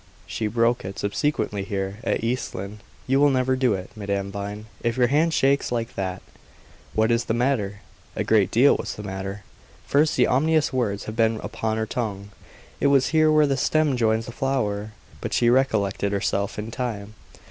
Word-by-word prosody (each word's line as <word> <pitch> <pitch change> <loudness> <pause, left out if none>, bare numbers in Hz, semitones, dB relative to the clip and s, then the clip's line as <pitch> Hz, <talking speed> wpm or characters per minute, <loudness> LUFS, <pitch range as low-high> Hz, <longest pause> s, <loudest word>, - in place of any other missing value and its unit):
She 110 - -3
broke 115 +2 +1
it 95 +1 -7
subsequently 105 -2 -1
here, 100 +1 -4
at - - -1
East 125 +3 -2
Lynne. 100 +3 -6 0.3
You 135 +1 +2
will 145 0 +5
never 130 -1 +2
do 130 -5 +2
it, 95 0 -7
Madame 100 -2 -3
Vine, 100 +1 -6 0.2
if 120 +1 -1
your 125 - +4
hand 150 +6 +2
shakes 140 -3 +2
like 115 -1 -2
that. 95 -1 -4 0.7
What 110 +1 +3
is 115 0 +1
the 110 - 0
matter?" 115 -6 0 0.3
A - - -1
great - - +3
deal - - +5
was - - -5
the 105 - -8
matter. 95 0 -5 0.4
First, 150 +2 +2
the 125 - +5
ominous 155 +2 +2
words 105 -6 -1
had 110 - -6
been 115 -1 +2
upon 110 -1 -2
her 110 - 0
tongue. 105 -3 -4 0.5
"It - - +3
was 135 -2 +4
here 155 -1 +4
where 155 -1 +5
the 140 -1 +1
stem 155 0 +2
joins 110 -1 +1
the 120 - -7
flower;" 110 -6 -2 0.3
but - - -4
she 120 -1 +4
recollected 105 -6 +1
herself 100 0 -1
in 105 +2 -5
time. 110 -4 -4
115 Hz, 190 wpm, -24 LUFS, 100-130 Hz, 0.7 s, will